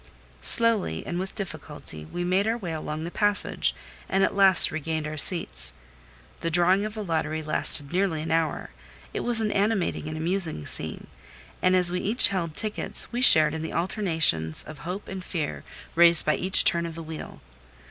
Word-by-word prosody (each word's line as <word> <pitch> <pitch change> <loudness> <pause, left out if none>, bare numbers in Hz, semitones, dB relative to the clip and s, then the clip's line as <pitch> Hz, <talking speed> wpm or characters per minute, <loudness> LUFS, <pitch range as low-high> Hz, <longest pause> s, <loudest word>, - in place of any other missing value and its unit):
Slowly 215 - +6
and 175 - -4
with 190 +1 -6
difficulty 125 - -9
we 175 - -6
made 185 +4 0
our 225 +1 -1
way 185 -8 -7
along 155 0 -6
the 170 - -7
passage, 205 +1 0 0.3
and 195 0 +1
at - - 0
last 195 -2 +5
regained 155 0 -4
our 155 0 -6
seats. - - 0 0.7
The 165 - -3
drawing 180 +4 +2
of 215 0 -7
the 215 - -5
lottery 160 -3 -3
lasted 150 -1 +1
nearly 180 -4 -1
an 165 - -6
hour; 165 -1 -2 0.4
it - - -4
was 235 -2 -1
an 215 -1 -2
animating 200 -5 -2
and 155 0 -6
amusing 165 - -1
scene; - - -2 0.6
and 185 0 +2
as 180 -1 +3
we 180 - -2
each 220 +7 +2
held 170 -5 -4
tickets, 215 -1 -3
we 240 +1 -4
shared 155 -10 +6
in 160 - -5
the 160 - -6
alternations 165 - -1
of 155 -2 -12
hope 180 +7 -7
and 190 -1 -8
fear 150 - -5 0.3
raised 170 -1 +5
by 155 - +1
each 190 +1 +5
turn 170 -1 +2
of 165 - -9
the 165 - -8
wheel. 160 0 -10
170 Hz, 185 wpm, -24 LUFS, 155-195 Hz, 0.7 s, Slowly